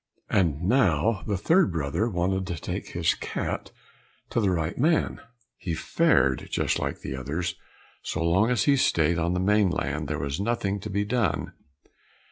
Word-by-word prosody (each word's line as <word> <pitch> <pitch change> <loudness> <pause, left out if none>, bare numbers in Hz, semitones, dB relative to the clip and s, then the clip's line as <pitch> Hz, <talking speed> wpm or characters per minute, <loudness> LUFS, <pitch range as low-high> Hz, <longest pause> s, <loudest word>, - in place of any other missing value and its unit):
And 85 -4 +1
now 100 - +2
the 100 -2 0
third 165 - +3
brother 80 +8 -1
wanted 95 0 -1
to 85 - -3
take - - -5
his - - +2
cat - - -4 0.6
to 120 - +1
the 100 - +2
right 85 -2 -1
man. 160 +5 +1 0.4
He 85 -6 -3
fared 70 -3 +2
just - - 0
like - - -3
the 65 - -5
others; 80 +7 -3 0.5
so 80 - -3
long 95 +7 +3
as 120 -5 +2
he 140 +3 +4
stayed 85 - +2
on 85 +2 0
the - - 0
mainland 90 -7 +1
there 75 +1 -2
was 70 +2 -3
nothing 100 -2 -1
to 105 - -7
be 100 +1 -1
done. 105 - -1
90 Hz, 165 wpm, -26 LUFS, 80-105 Hz, 0.6 s, he